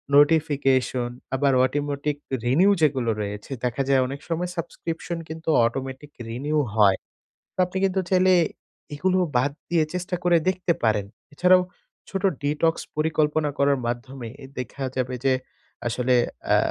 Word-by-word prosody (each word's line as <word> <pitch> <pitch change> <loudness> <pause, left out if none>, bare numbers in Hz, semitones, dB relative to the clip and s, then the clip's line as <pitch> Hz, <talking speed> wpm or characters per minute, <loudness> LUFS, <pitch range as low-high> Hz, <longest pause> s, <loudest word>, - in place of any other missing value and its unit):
Notification 140 -5 +3 0.3
আবার 140 0 +2
automatic 145 +2 -2 0.3
renew 165 +12 +4
যেগুলো 135 -6 +2
রয়েছে, 105 +3 -6
দেখা 125 +2 0
যায় 135 -1 +5
অনেক 140 +2 -6
সময় 175 +2 -1
সাবস্ক্রিপশন 170 +1 -4
কিন্তু 160 +1 -5 0.2
অটোমেটিক 135 +4 -4 0.2
রিনিউ 145 +7 -2 0.2
হয়, 100 -3 +5 0.7
আপনি 180 +1 -5
কিন্তু 190 0 +1
চাইলে, 185 0 +4 0.6
এগুলো 185 +5 +1 0.2
বাদ 145 +4 +2 0.2
দিয়ে 165 -2 +3
চেষ্টা 180 +1 -2
করে 175 -1 +5
দেখতে 180 -2 0
পারেন। 105 -3 +2 0.3
এছাড়াও, 180 +3 +5 0.5
ছোট 195 0 -3 0.2
ডিটক্স 150 +3 +1 0.2
পরিকল্পনা 155 -1 +1
করার 140 -1 +3
মাধ্যমে 120 +1 -5 0.2
এ - - -7
দেখা 130 +2 -5
যাবে 130 0 -1
যে, 135 - +5 0.5
আসলে 125 +2 +1 0.3
অ্যা - - +5
145 Hz, 135 wpm, -24 LUFS, 130-165 Hz, 0.7 s, যায়